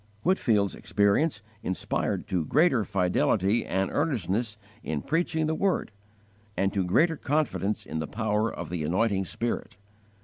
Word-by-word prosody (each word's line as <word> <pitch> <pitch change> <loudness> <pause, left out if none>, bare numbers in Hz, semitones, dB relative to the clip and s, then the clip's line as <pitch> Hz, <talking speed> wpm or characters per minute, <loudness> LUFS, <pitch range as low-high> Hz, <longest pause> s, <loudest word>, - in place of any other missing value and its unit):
Whitefield's 110 - +2
experience 105 +4 +1 0.2
inspired 95 - -2
to 90 -3 +1
greater 130 - +3
fidelity 100 +2 +1
and 95 0 0
earnestness 115 - -1 0.2
in 75 -2 -3
preaching 160 +1 0
the 155 - 0
Word, 185 - 0 0.7
and 95 0 +1
to 100 -2 +1
greater 160 - +3
confidence 140 -9 -1
in 80 - -4
the 80 - -3
power 110 0 0
of 85 -1 -7
the 85 -3 -2
anointing 95 +4 +1
Spirit. 115 -1 -3
105 Hz, 135 wpm, -27 LUFS, 95-145 Hz, 0.7 s, greater